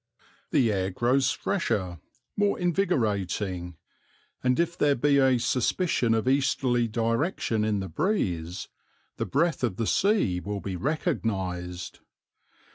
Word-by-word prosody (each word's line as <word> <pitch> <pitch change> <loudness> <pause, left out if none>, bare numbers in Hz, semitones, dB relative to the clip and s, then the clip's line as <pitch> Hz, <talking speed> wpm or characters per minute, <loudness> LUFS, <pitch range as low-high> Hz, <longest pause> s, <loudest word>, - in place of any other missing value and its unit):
The 120 -4 +3
air 95 -2 0
grows 125 +7 +2
fresher, 95 - -1 0.4
more 205 0 +1
invigorating, 105 - -1 0.7
and 125 +2 +2
if 170 0 +1
there 145 -3 +3
be 140 +2 +3
a 130 -2 +4
suspicion 120 +1 +1
of 110 +2 -1
easterly 130 -3 +2
direction 115 - 0
in 105 -2 0
the 95 - -4
breeze 90 - -1 0.5
the - - -2
breath 155 0 +1
of 115 -7 0
the 115 - -1
sea 190 - +2
will 100 +2 -4
be 95 -1 -5
recognized. 95 - -2
115 Hz, 120 wpm, -27 LUFS, 95-145 Hz, 0.7 s, a